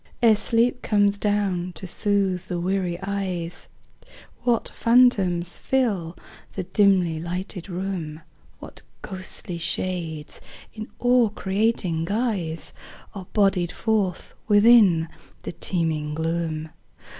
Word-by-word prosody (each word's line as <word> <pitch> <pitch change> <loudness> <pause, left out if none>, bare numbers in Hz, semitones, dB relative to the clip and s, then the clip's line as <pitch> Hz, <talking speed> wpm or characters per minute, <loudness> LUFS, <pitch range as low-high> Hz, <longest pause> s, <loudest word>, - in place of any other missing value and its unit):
Ere 225 -2 +7
sleep 235 +3 +1
comes 205 -1 +2
down 200 -4 0
to 190 - -6
soothe 190 -1 0
the 175 - -3
weary 180 -1 -1
eyes, 185 -4 -3 0.7
What 240 -2 +1
phantoms 200 -8 +3
fill 200 -11 0 0.4
the 190 - -3
dimly 180 -4 +2
lighted 180 +2 -5
room; 175 -4 -4 0.4
What - - -11 0.2
ghostly 185 -2 -6
shades 165 -3 -3 0.3
in 215 0 -7
awe 245 -2 +4
creating 195 -5 0
guise 200 -6 -2 0.4
Are 190 -3 -8
bodied 190 -4 +2
forth 210 -5 -1
within 205 -6 +6 0.4
the - - -4
teeming 160 -4 -2
gloom. 160 -1 -2
190 Hz, 105 wpm, -24 LUFS, 170-210 Hz, 0.7 s, Ere